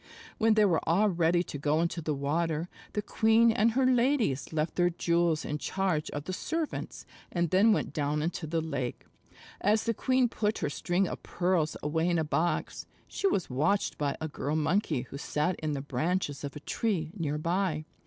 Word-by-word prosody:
When 225 -1 +4
they 215 -1 +5
were 175 -5 +3
all 200 +6 +4
ready 175 -1 +2
to 145 - -7
go 150 +2 +1
into 170 +1 -1
the 155 -1 -1
water, 160 +4 -1 0.2
the 210 - -1
queen 225 +2 +4
and 225 +1 +2
her 265 +1 +2
ladies 245 - +2
left 155 0 -1
their 175 0 +3
jewels 170 -2 +1
in 150 +1 -3
charge 185 -5 -1
of 145 - -5
the 185 - -5
servants, 320 - -4 0.3
and 170 -2 0
then 200 +5 +5
went 210 - 0
down 150 0 0
into 165 0 -3
the 165 +1 0
lake. 140 -6 -4 0.6
As 210 +2 +3
the 230 - 0
queen 255 +3 +2
put 215 -2 -1
her 145 - -2
string 180 +5 0
of - - -6
pearls 175 -3 0
away 160 +3 +1
in 170 - +2
a 160 - +1
box, 160 +3 -1 0.2
she 395 - -1
was 190 - 0
watched 155 +10 0
by 145 -2 -1
a 160 - -3
Girl 145 0 -3
Monkey 160 - +1
who 140 - -9
sat 150 +5 0
in 155 -1 -2
the 140 - -3
branches 145 +2 -2
of 140 0 -5
a 150 - -7
tree 170 -5 -1
near 150 -6 -2
by. 170 -1 -1
170 Hz, 195 wpm, -29 LUFS, 150-200 Hz, 0.6 s, they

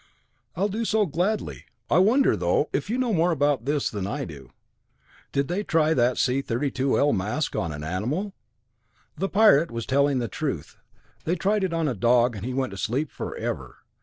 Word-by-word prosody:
"I'll 195 +4 +1
do 215 +3 -3
so 220 -1 +2
gladly. 185 +6 -2 0.2
I 165 - +3
wonder, 225 - +4
though, 90 - 0
if 145 +7 -2
you 235 - 0
know 250 -3 0
more 170 0 +3
about 145 -6 +1
this 145 0 0
than 100 -3 -3
I - - -3
do. 75 -5 -11 0.8
Did 140 0 0
they 180 +4 -1
try 160 -4 +2
that 125 -3 +2
C 130 +1 +1
32L 135 +3 +1
mask 110 +11 -2
on 85 - -1
an 75 0 -6
animal?" 125 - -2 0.8
"The 195 +5 -2
Pirate 200 -7 +5
was 115 -1 -5
telling 140 0 +2
the 120 -2 -1
truth. - - -4 0.5
They 170 - +1
tried 205 +2 +1
it 185 - 0
on 165 -2 0
a 135 - 0
dog 120 +2 +3
and 100 - -7
he 125 - -3
went 130 -4 -1
to 100 - -8
sleep 130 +9 -1
forever. - - -5
145 Hz, 190 wpm, -25 LUFS, 120-180 Hz, 0.8 s, Pirate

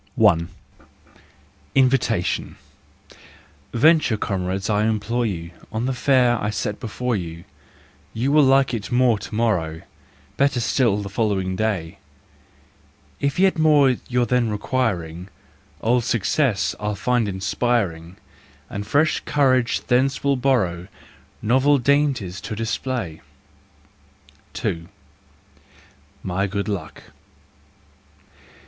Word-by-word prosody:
XI 110 - +4
I. 85 -4 +3 1.3
Invitation. 130 -8 +1 1.2
Venture, 150 -3 +4
comrades, 95 0 -2
I 105 0 +1
implore 115 +2 0
you, 85 -4 -5 0.2
On 110 +2 -2
the 135 - 0
fare 125 -2 +2
I 105 - 0
set 105 0 -3
before 125 +1 -2
you, 85 -3 -5 0.7
You 125 +5 -1
will 150 +1 +6
like 135 -1 +4
it 115 +1 -4
more 120 -3 +3
to 105 - -8
morrow, 85 -9 0 0.5
Better 140 -2 +2
still 115 -4 +1
the 100 - -6
following 100 -3 -1
day: 95 -4 -2 1.2
If 140 -1 -1
yet 185 -2 +3
more 145 -4 +5
you're 125 -1 +2
then 120 0 +1
requiring, 100 -7 -2 0.5
Old 120 +2 +2
success 115 -1 +1
I'll 105 0 -2
find 120 +3 0
inspiring, 95 -3 -1 0.5
And 105 +1 -5
fresh 150 +7 +2
courage 130 -4 +1
thence 130 +3 +1
will 140 0 +2
borrow 105 -10 0 0.6
Novel 130 +6 +4
dainties 135 -9 0
to 110 - -5
display. 115 -5 -3 1.3
2. 85 0 -3 1.4
My 95 +2 -1
Good 100 +1 -3
Luck. 95 -7 -5
115 Hz, 110 wpm, -22 LUFS, 95-130 Hz, 1.4 s, will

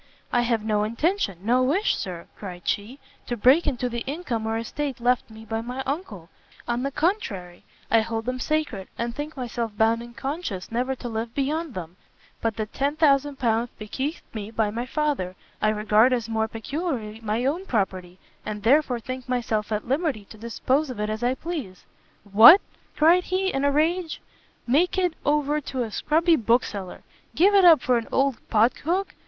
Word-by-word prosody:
"I 240 - +4
have 230 -2 0
no 210 -1 +1
intention, 230 - 0
no 245 +4 +3
wish, 310 +12 +2
Sir," 175 -3 -5
cried 180 -4 -9
she, 215 +6 -2 0.3
"to 240 - -2
break 260 +10 +5
into 250 -3 0
the 235 -1 -4
income 265 -7 -3
or 225 0 0
estate 270 +4 -4
left 245 +1 +1
me 220 0 -12
by 225 0 -3
my 250 +3 -5
uncle; 245 - -5 0.4
on 240 0 -1
the 275 - -1
contrary, 275 - -2 0.3
I 225 0 +6
hold 225 0 -3
them 255 +1 -2
sacred, 300 -11 -1
and 235 0 -2
think 295 +1 -6
myself 235 -4 -4
bound 225 +1 +3
in 235 0 -11
conscience 270 - -4
never 250 +3 -1
to 245 - -7
live 225 0 -4
beyond 295 +1 -1
them: 175 0 -7 0.4
but 225 -2 0
the 215 - -1
L10,000 275 -3 +1
bequeathed 265 +9 -4
me 215 -2 -5
by 220 -2 0
my 235 +3 -4
Father, 275 -12 -1 0.3
I 215 - +3
regard 215 +3 +3
as 235 -3 -1
more 220 -1 0
peculiarly 225 -2 -4
my 225 +3 -1
own 340 +8 -1
property, 185 -5 -2 0.3
and 210 -1 -5
therefore 255 0 +3
think 255 +2 -7
myself 220 -4 -1
at 210 +1 -2
liberty 270 - -1
to 220 - -11
dispose 260 +6 0
of 245 -4 -6
it 210 0 -1
as 215 +1 -4
I 245 +2 +1
please." 280 - -6 0.4
"What," 220 - +9 0.4
cried 340 +4 +5
he, 380 +1 0
in 270 - 0
a 285 - +3
rage, 325 +3 0 0.5
"make 320 +10 +2
it 360 -3 +2
over 295 0 +1
to 260 -3 -3
a 225 - -6
scrubby 325 +7 +2
bookseller! 220 -5 -1 0.3
give 390 +5 +5
it 390 -2 +6
up 325 -6 +8
for 250 -2 +3
an 230 - -8
old 270 -3 +2
pot 225 +2 +4
hook? 370 +5 -1
245 Hz, 180 wpm, -25 LUFS, 220-295 Hz, 0.5 s, What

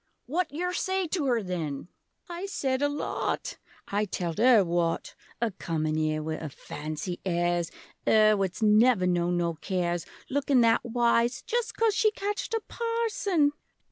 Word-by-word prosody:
What 340 +8 -1
yer 360 +5 -2
say 380 +1 0
to 315 -5 0
'er, 235 -4 +1
then? 165 -6 -4 0.4
I 350 +2 -5
said 265 -8 -1
a 290 - +3
lot! 290 - -3 0.3
I 205 +1 0
telled 175 -2 -3
'er 235 -3 +6
what! 170 -1 -1 0.3
A 235 -1 0
comin' 155 -4 -2
ere 155 0 0
wi' 160 0 -3
'er 155 - -5
fancy 155 +5 -6
airs, 175 -2 0 0.4
'Er 215 -1 +6
what's 195 +1 -2
never 215 -1 +5
known 175 0 +1
no 170 -1 0
cares, 175 0 -2 0.2
Lookin' 275 -2 +2
that 230 -1 +4
wise 240 +2 +1
Just 475 0 -2
coz 450 -2 +3
she 430 +1 +3
catched 415 +3 -3
a 450 - -1
Parson! 445 -9 0
220 Hz, 155 wpm, -28 LUFS, -, 0.4 s, er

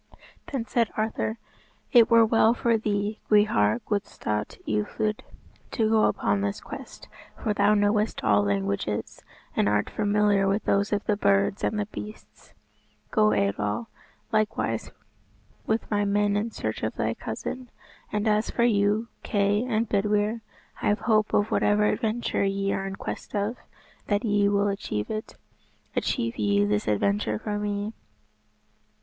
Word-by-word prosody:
Then 260 -5 -2
said 235 -2 +1
Arthur, 220 +1 -1 0.5
"It 235 -3 +6
were 230 -1 +6
well 225 +1 +4
for 235 -1 +2
thee, 210 -1 -1
Gwrhyr 120 - +3
Gwalstawt 105 - -3
Ieithoedd, 110 - -1 0.5
to 220 -2 0
go 220 -1 +4
upon 100 -1 +1
this 100 0 -2
quest, - - -10 0.3
for 215 - -1
thou 205 +1 +3
knowest 210 - +1
all 105 -2 +4
languages, 100 +1 -2 0.3
and 100 - +2
art 105 0 0
familiar 205 -1 +2
with 200 +2 +1
those 200 +1 +1
of 205 -1 0
the 210 - +2
birds 100 - +2
and 210 - 0
the 205 - 0
beasts. 215 +1 -11 0.6
Go, 215 -1 +4
Eidoel, 105 - -1 0.4
likewise 210 - 0 0.8
with 220 +1 -1
my 205 -1 +2
men 205 0 +1
in 210 +3 0
search 110 - -4
of 110 - -2
thy 110 +1 0
cousin. 245 - -6 0.4
And 210 +1 -1
as 215 +1 +2
for 235 - 0
you, 210 0 +2
Kay 205 +1 +1
and 230 -2 0
Bedwyr, 210 +2 +1 0.4
I - - 0
have 210 +1 +1
hope 215 -2 +2
of 205 +1 +1
whatever 210 0 +3
adventure 220 0 0
ye 195 0 0
are 195 - -2
in 195 - -5
quest - - -6
of, 205 +3 0 0.5
that 205 +3 0
ye 205 -1 +3
will 200 0 +2
achieve 195 - -3
it. 215 0 -5 0.6
Achieve 115 0 -1
ye 100 -1 +3
this 105 0 0
adventure 105 +1 +1
for 205 - -3
me." 205 +1 -2
205 Hz, 150 wpm, -26 LUFS, -, 0.8 s, It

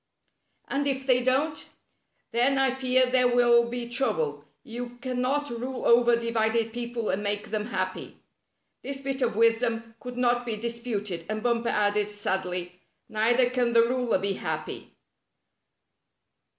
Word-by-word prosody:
'^ - - -53 0.6
"And 285 +1 -1
if 270 -1 -1
they 255 -2 +4
don't?" 275 +5 +1 0.4
" - - -47
Then 250 +4 +2
I 270 -1 +3
fear 255 0 +2
there 250 0 +3
will 240 -1 +4
he 240 0 -4
trouble. 185 - 0 0.2
You 240 +1 -7
can 250 0 -3
not 285 +2 0
rule 250 +2 -4
over 240 0 +5
a 235 - +3
divided 225 -1 0
people 240 -2 -3
and 190 - -1
make 205 0 -3
them 215 -1 -2
happy." - - -4 0.6
This 275 0 -4
bit 270 0 -3
of 235 -4 +1
wisdom 230 0 +1
could 250 -1 -8
not 245 -1 +2
be 230 -3 -3
disputed, 215 -6 -4
and 215 0 -3
Bumper 235 -1 +1
added 210 0 +1
sadly: 180 -3 -3 0.3
"Neither 235 +4 +3
can 245 -2 +1
the 230 0 +6
ruler 245 -1 +1
be 195 +1 -1
happy." 160 -4 -5
235 Hz, 155 wpm, -27 LUFS, 215-250 Hz, 0.6 s, the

